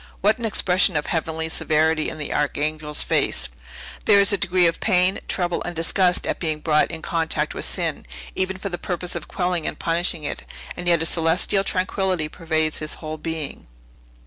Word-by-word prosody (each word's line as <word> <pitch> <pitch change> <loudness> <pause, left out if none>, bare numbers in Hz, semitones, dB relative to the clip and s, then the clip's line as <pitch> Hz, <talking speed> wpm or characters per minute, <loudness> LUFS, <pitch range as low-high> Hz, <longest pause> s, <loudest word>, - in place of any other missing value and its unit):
What 215 +4 +3
an 235 - -3
expression 185 -4 +2
of 150 - -1
heavenly 160 0 -2
severity 160 0 +1
in - - -7
the 150 - -3
Archangel's 150 +1 -1
face! - - 0 0.6
There 200 - +6
is 200 +1 +5
a - - +3
degree 185 -1 +3
of 165 0 +1
pain, 185 -2 +3
trouble, 175 -1 0
and 175 - -5
disgust 180 +2 +3
at - - -2
being 155 -3 -1
brought 150 -1 +2
in 165 -1 -6
contact 160 -2 -1
with - - -1
sin, 165 -5 -2 0.3
even 190 0 -1
for 200 +1 -4
the 175 - -5
purpose 180 -1 -3
of 170 -3 -5
quelling 180 -3 -1
and - - -3
punishing 170 -1 0
it; - - -3 0.3
and 175 - -5
yet 170 -2 +4
a - - 0
celestial 165 +4 +2
tranquillity 185 -3 0
pervades 160 -2 -1
his 155 0 -4
whole 155 -1 -6
being." 160 - -4
165 Hz, 185 wpm, -23 LUFS, 155-180 Hz, 0.6 s, There